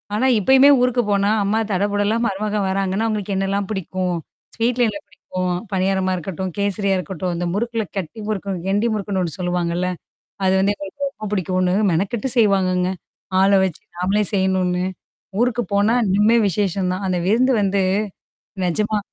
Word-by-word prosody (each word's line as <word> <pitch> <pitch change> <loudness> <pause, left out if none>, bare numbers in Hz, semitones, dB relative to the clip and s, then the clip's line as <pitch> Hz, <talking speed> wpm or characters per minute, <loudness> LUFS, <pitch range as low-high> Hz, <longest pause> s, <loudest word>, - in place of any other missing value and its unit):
ஆனா 235 +5 +1
இப்பயுமே 265 +6 +6
ஊருக்கு 250 -1 +2
போனா, 200 0 +2
அம்மா 210 +3 +1
தடபுடலா 205 +3 +1
மருமகன் 205 -1 -1
வராங்கன்னா, 195 +3 0
அவுங்களுக்கு 205 -3 -2
என்னல்லாம் 195 0 -1
பிடிக்கும்? 185 -2 -2 0.4
ஸ்வீட்ல 240 +1 +2
என்ன 200 -1 -5
பிடிக்கும்? 185 -2 -4 0.2
பனியாரமா 190 0 +1
இருக்கட்டும், 185 +1 -4
கேசரியா 200 -1 0
இருக்கட்டும், 185 -1 -3
அந்த 175 +1 -2
முறுக்குல 230 +1 -1
கட்டி 195 +4 -5
முறுக்கு 200 -2 -2 0.2
கெண்டி 205 +4 +1
முறுக்குன்னு 200 -2 -2
ஒண்ணு 170 +3 -4
சொல்லுவாங்கல்ல! 175 0 -1 0.6
அது 190 - +3
வந்து 200 +1 +2
எனக்கு 200 +9 -9
ரொம்ப 215 -6 -8
புடிக்குனு 185 -1 +1 0.2
மெனக்கட்டு 200 +8 -1
செய்வாங்கங்க. 185 -4 +3 0.5
ஆள 195 - +5
வச்சு 185 -5 -4
நாமளே 195 +4 +1
செய்யணுன்னு. 185 -1 +1 0.6
ஊருக்கு 245 -1 +1
போனா 205 +3 +3
இன்னுமே 210 +4 +4
விசேஷம் 190 0 0
தான். 185 +2 -4
அந்த 185 - 0
விருந்து 250 +6 +3
வந்து 200 0 +1 0.8
நிஜமா. 210 +4 0
195 Hz, 145 wpm, -21 LUFS, 185-210 Hz, 0.8 s, இப்பயுமே